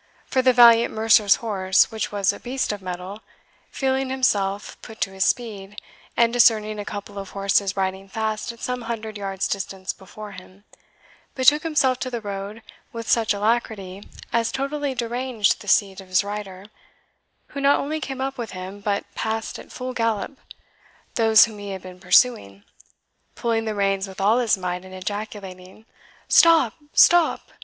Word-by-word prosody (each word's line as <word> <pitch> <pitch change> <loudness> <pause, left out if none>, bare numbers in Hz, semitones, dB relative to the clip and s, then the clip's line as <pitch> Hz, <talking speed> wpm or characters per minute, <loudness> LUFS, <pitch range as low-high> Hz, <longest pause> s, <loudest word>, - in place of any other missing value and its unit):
For 260 - +1
the 255 0 +5
valiant 235 -1 +6
mercer's 220 -2 +4
horse, 190 -3 +2
which 220 -1 -3
was 200 0 +1
a - - -10
beast 255 0 -2
of 205 -1 -6
mettle, 185 +3 -7 0.5
feeling 265 0 -1
himself 205 -7 0
put 220 -1 -12
to 195 - 0
his 190 0 0
speed, 210 -4 -2 0.4
and 235 0 +3
discerning 215 -3 +3
a 205 - -5
couple 205 0 -7
of 195 -1 -8
horses 195 0 0
riding 190 0 -2
fast 220 +2 -3
at 235 - -16
some 250 0 -3
hundred 220 -2 -5
yards' 195 -1 -3
distance 195 -1 -4
before 205 +2 -11
him, 185 +1 -14 0.7
betook 290 +3 +4
himself 290 -6 +1
to 255 - -3
the 240 -2 -4
road 205 +1 -6 0.3
with 230 -1 -7
such 225 -2 +2
alacrity 205 -2 -1 0.3
as 230 -1 +1
totally 275 0 -3
deranged 240 -3 0
the 205 - -12
seat 195 -1 +2
of 190 - -15
his 185 +1 +2
rider, 200 -2 -7 0.8
who 280 - -6
not 280 +1 +4
only 310 +3 -3
came 270 -2 -5
up 270 -1 -3
with, 235 - -5 0.3
but 200 -1 -1
passed 220 0 -3
at - - -13
full 255 0 -5
gallop, 230 +2 -1 0.8
those 225 -2 +6
whom 220 -3 -10
he 205 0 -7
had 190 -1 -6
been 185 -1 -11
pursuing, 180 - +2 0.7
pulling 225 -1 -1
the 215 -1 -3
reins 195 -1 0
with 190 0 -11
all 210 +5 +3
his 230 -5 +2
might, 180 -1 -4
and 185 0 -11
ejaculating, 195 0 -7 0.4
"Stop! 325 -9 +5 0.2
stop!" 345 -2 +4
215 Hz, 165 wpm, -23 LUFS, 195-240 Hz, 0.8 s, valiant